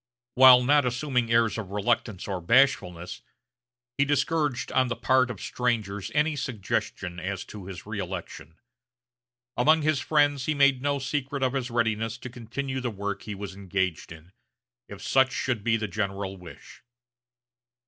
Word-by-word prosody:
While 125 -1 +8
not 145 +3 +4
assuming 125 -1 -1
airs 115 -1 +2
of 100 -4 -6
reluctance 105 -1 -1
or 95 -3 -3
bashfulness, 90 -6 +2 0.8
he - - +6
discouraged 145 -2 0
on 130 0 +2
the 115 - -2
part 130 +2 +2
of 110 -6 -6
strangers 110 -5 -2
any 150 +1 +2
suggestion 95 -7 -3
as 95 0 -4
to 100 -3 -10
his 95 -4 -8
reëlection. 95 -5 -6 1.0
Among 155 +5 +4
his 155 -2 +2
friends 145 -3 +1
he 155 - +1
made 140 -2 +4
no 140 +1 0
secret 140 0 -3
of 130 0 +1
his 130 -2 -2
readiness 115 -1 -1
to 125 0 -9
continue 130 +3 -5
the 125 - -2
work 100 -1 -4
he 105 - -6
was 100 -1 -7
engaged 95 -4 -3
in, 80 +2 -13 0.6
if - - -10
such 130 0 +3
should 120 -6 -2
be 115 0 +2
the 110 -1 -3
general 100 0 -3
wish. 90 -3 -13
120 Hz, 155 wpm, -26 LUFS, 100-135 Hz, 1.0 s, While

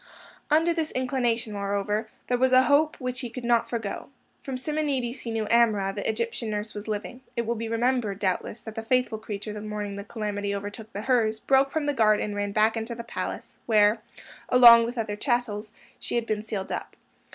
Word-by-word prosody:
Under 325 +3 +4
this 325 -2 -1
inclination, 245 -3 0
moreover, 205 +2 -1 0.2
there 245 -1 0
was 260 0 +3
a 255 0 +7
hope 295 +3 +3
which 250 -1 -3
he 250 -2 -5
could 250 +1 -7
not 235 -1 +2
forego. 225 -4 -4 0.3
From 265 -2 -4
Simonides 270 -3 -2
he 235 - -6
knew 225 -1 -1
Amrah, 215 -5 +3
the 205 +1 -3
Egyptian 230 +1 -2
nurse, 210 0 -3
was 205 +1 -7
living. 215 +4 -4
It 235 - 0
will 235 - 0
be 230 0 -4
remembered, 230 -3 0
doubtless, 195 +3 -2
that 220 - -8
the 225 - -4
faithful 245 -1 +1
creature, 210 -1 -6
the 210 - -6
morning 210 -1 -4
the 200 - -5
calamity 205 -2 -3
overtook 205 +2 -7
the 205 - -5
Hurs, 220 -3 +2
broke 270 +2 +3
from 310 +1 -2
the 290 - +1
guard 215 -4 +4
and 210 -1 -3
ran 205 0 -2
back 215 +2 +3
into 225 +1 -4
the 235 - -6
palace, 230 - -6
where, 215 -1 +4 0.5
along 235 -2 +9
with 240 +2 -5
other 215 -2 -2
chattels, 220 -3 -1 0.3
she - - -4
had 235 -1 0
been 215 -2 -1
sealed 210 -3 -4
up. - - -5
225 Hz, 205 wpm, -26 LUFS, 210-250 Hz, 0.5 s, along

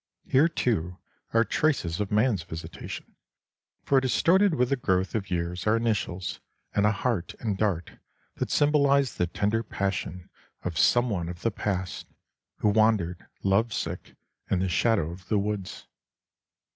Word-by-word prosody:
Here, 140 +5 +4
too, 90 - -1 0.3
are 115 0 +4
traces 110 - 0
of 105 -1 -2
man's 105 -2 +2
visitation, 80 0 -8 0.7
for 135 -1 +3
distorted 175 +8 +3
with 125 -3 +2
the 140 - +2
growth 95 -6 0
of 100 -3 -2
years 90 +2 -2
are 110 +2 +4
initials, 105 -5 -2 0.3
and 105 0 +3
a - - +4
heart 110 -4 -2
and 110 -4 -1
dart 95 -5 -2 0.4
that - - -2
symbolized 140 -2 +3
the 90 - +2
tender 105 +6 0
passion 95 -4 -3 0.3
of 90 -2 -3
some 120 +9 +3
one 85 -4 -2
of 85 0 -8
the 115 - +2
past, 95 -3 -3 0.5
who 105 - +4
wandered, 105 -5 +2 0.2
love 100 +4 +2
sick, - - -4 0.3
in 95 - +2
the 95 +1 0
shadow 95 -3 +2
of 90 +1 -11
the 105 - +2
woods. 100 -2 -3
105 Hz, 150 wpm, -27 LUFS, 90-120 Hz, 0.7 s, Here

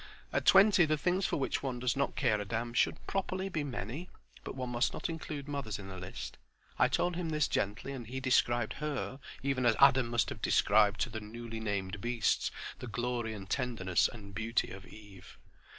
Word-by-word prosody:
At - - 0
twenty 195 -2 +7
the 155 0 +1
things 185 +5 +1
for - - -1
which 135 - -1
one 130 -3 -2
does 125 0 0
not 140 0 0
care 110 -6 +2
a - - -1
damn 115 +3 -3
should, 120 - +1
properly, 190 0 -2
be 155 -5 -2
many, 140 - -5 0.3
but - - -6
one 130 -2 -4
must 120 +2 +1
not - - -3
include 155 -3 -5
mothers 140 -8 -3
in 95 -1 -8
the 95 -1 -7
list. 90 +1 -7 0.4
I - - +6
told 175 0 +1
him 170 -2 -2
this 150 -2 +2
gently; 105 +7 -1
and 125 -5 -6
he 130 +3 -4
described 120 -3 +2
Her, 145 -3 -3 0.2
even 135 -2 0
as 115 -2 +4
Adam 135 -3 +6
must 115 -4 +1
have - - -7
described 105 -1 +4
to 120 - 0
the 110 - -5
newly 115 +1 -7
named 100 -2 -3
beasts 120 -1 +1 0.3
the 125 - -6
glory 120 -1 -2
and 95 -2 -8
tenderness 95 -6 +1
and 100 -4 -11
beauty 115 +3 0
of 95 -1 -9
Eve. 100 -4 -13
120 Hz, 200 wpm, -32 LUFS, 105-140 Hz, 0.4 s, twenty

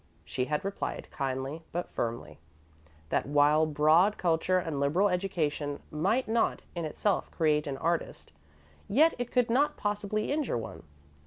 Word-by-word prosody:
She 125 - -2
had 150 +5 -2
replied 200 0 -4
kindly, 135 +3 -3
but 175 +1 -4
firmly, 115 -10 -4 0.7
that - - 0
while 145 +2 +4
broad 155 +7 +4
culture 175 +1 +1
and 165 -5 -2
liberal 165 +9 +2
education 155 -6 -1
might 195 +12 +1
not, 225 +1 +1
in 170 -2 -3
itself, 190 +6 -1
create 150 -2 +1
an 135 -1 -3
artist, 165 +3 -2 0.6
yet 310 +10 +5
it 245 -1 -3
could 245 -2 +2
not 280 +5 +2
possibly 210 +1 -2
injure 290 - 0
one. 80 -8 -7
165 Hz, 145 wpm, -29 LUFS, 145-205 Hz, 0.7 s, yet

